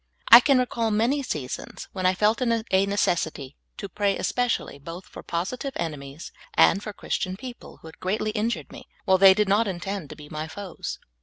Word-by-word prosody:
I 235 - +13
can 275 +1 +3
recall 235 -2 0
many 230 +7 +1
seasons 150 - -5
when 185 -1 0
I 185 - +2
felt 215 +6 +2
it 250 - +1 0.2
a 190 +1 +3
necessit}^ 160 -8 -1 0.2
to 200 - -5
pray 200 0 0
espe 245 - 0
cially 140 - -3
both 170 +4 -8
for - - -11
positive 245 +11 -3
enemies 150 -2 -6 0.2
and 200 - +5
for 210 - -6
Christian 185 -2 -3
peo 255 +2 -7
ple, - - -15
who - - -10
had 160 - -14
greatl}^ 210 +3 -1
injured 225 +2 -2
me, - - -11 0.2
while 190 0 +4
they 190 0 +8
did 210 0 +2
not 205 +3 +3
intend 190 -3 -4
to - - -8
be 150 - -12
my 155 +1 -5
foes. 195 +2 -6
195 Hz, 205 wpm, -25 LUFS, 170-220 Hz, 0.2 s, I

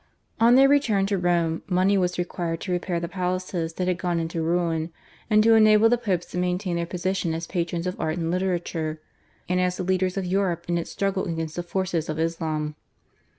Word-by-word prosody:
On 235 +2 +6
their 270 +1 +7
return 240 -9 +3
to 200 0 0
Rome 170 -2 +1
money 185 +2 +3
was 180 -2 0
required 170 -2 -3
to 185 - -4
repair 175 -1 -1
the 170 - -3
palaces 180 -2 -2
that 180 +2 -2
had 180 -1 0
gone 175 -2 0
into 165 0 -3
ruin, 165 -1 0 0.4
and 215 -1 +5
to 225 +1 +6
enable 215 0 +6
the 245 - +3
Popes 185 -7 -1
to 180 - -3
maintain 180 0 -1
their 170 0 -2
position 180 -1 -1
as 165 +1 -4
patrons 170 0 -2
of 180 - -3
art 155 +2 -1
and 165 -1 -1
literature, 175 -4 -2 0.5
and 180 +1 +1
as 180 0 0
the - - -2
leaders 185 0 0
of 195 - -1
Europe 180 -2 0
in 170 0 0
its 170 - -5
struggle 195 -1 -1
against 165 -3 -4
the 175 - -2
forces 175 -2 -2
of 155 - -2
Islam. 160 -2 -2
180 Hz, 205 wpm, -25 LUFS, 170-190 Hz, 0.5 s, their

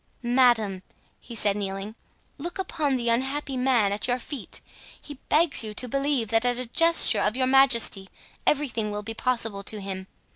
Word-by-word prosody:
"Madame," 240 -6 +2 0.4
he 235 - -11
said, 205 -2 +2
kneeling, 195 +1 -4 0.5
"look 345 +4 -5
upon 315 -7 -1
the 240 -2 -2
unhappy 265 +4 0
man 250 -5 +2
at 205 +3 0
your 245 0 +1
feet. 255 0 -6 0.4
He 290 -3 -11
begs 310 -5 +3
you 215 -1 -7
to 250 - -3
believe 275 -3 -1
that 225 +1 +2
at 245 -1 +2
a 255 - -2
gesture 330 +8 +4
of 210 +2 0
your 260 - +1
majesty 250 -7 +4 0.4
everything 240 -7 0
will 210 0 -5
be 225 +2 -6
possible 225 -4 -1
to 210 +1 -5
him. 190 -1 -6
240 Hz, 175 wpm, -25 LUFS, 210-270 Hz, 0.5 s, gesture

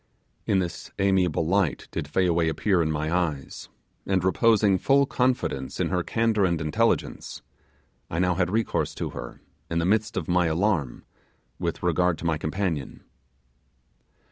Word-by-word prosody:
In 100 - +3
this 90 -3 -3
amiable 95 -5 +2
light 95 -1 0
did 70 - -4
Fayaway 85 0 +2
appear 95 +2 +1
in 80 -1 0
my 80 +2 -1
eyes; 75 -7 -3 0.4
and 95 -2 +1
reposing 100 0 +3
full 140 +5 +4
confidence 125 - -1
in - - 0
her 90 -1 0
candour 110 +2 +1
and 85 -3 +1
intelligence, 95 +10 -1 0.7
I 80 - -4
now 90 +1 +2
had 90 0 0
recourse 110 +3 -1
to - - -4
her, - - -8 0.3
in 85 - -1
the 85 - +1
midst 105 +3 +1
of 85 -4 -2
my 90 -1 +2
alarm, 80 - 0 0.6
with 85 0 -3
regard 90 0 +2
to - - -8
my 80 -2 0
companion. 80 -3 -3
90 Hz, 150 wpm, -25 LUFS, 80-100 Hz, 0.7 s, full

